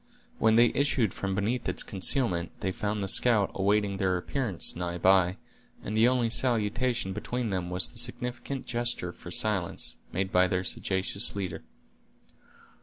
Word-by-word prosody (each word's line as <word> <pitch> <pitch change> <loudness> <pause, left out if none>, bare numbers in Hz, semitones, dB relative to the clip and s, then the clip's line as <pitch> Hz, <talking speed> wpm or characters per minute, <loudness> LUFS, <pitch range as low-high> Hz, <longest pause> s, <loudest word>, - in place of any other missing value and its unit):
When 110 0 +3
they 120 +1 +5
issued 130 - 0
from 95 -1 -4
beneath 110 +5 -2
its - - +1
concealment, 95 -3 +1
they 95 - -1
found 105 +1 -3
the - - -3
scout 105 -1 +4
awaiting 100 0 0
their 95 -2 0
appearance 110 - -1
nigh 90 0 -4
by, 90 0 +3 0.5
and 105 - -4
the 110 +2 +4
only 125 -2 +1
salutation 115 -2 +1
between 115 +2 -4
them 90 -2 -3
was 90 +1 +1
the - - -3
significant 125 +2 -3
gesture 120 -7 -2
for - - -12
silence, 95 -1 0
made 95 +1 -3
by 90 0 +4
their 90 0 -1
sagacious 95 +2 +1
leader. 95 -3 -4
100 Hz, 155 wpm, -28 LUFS, 95-120 Hz, 0.5 s, they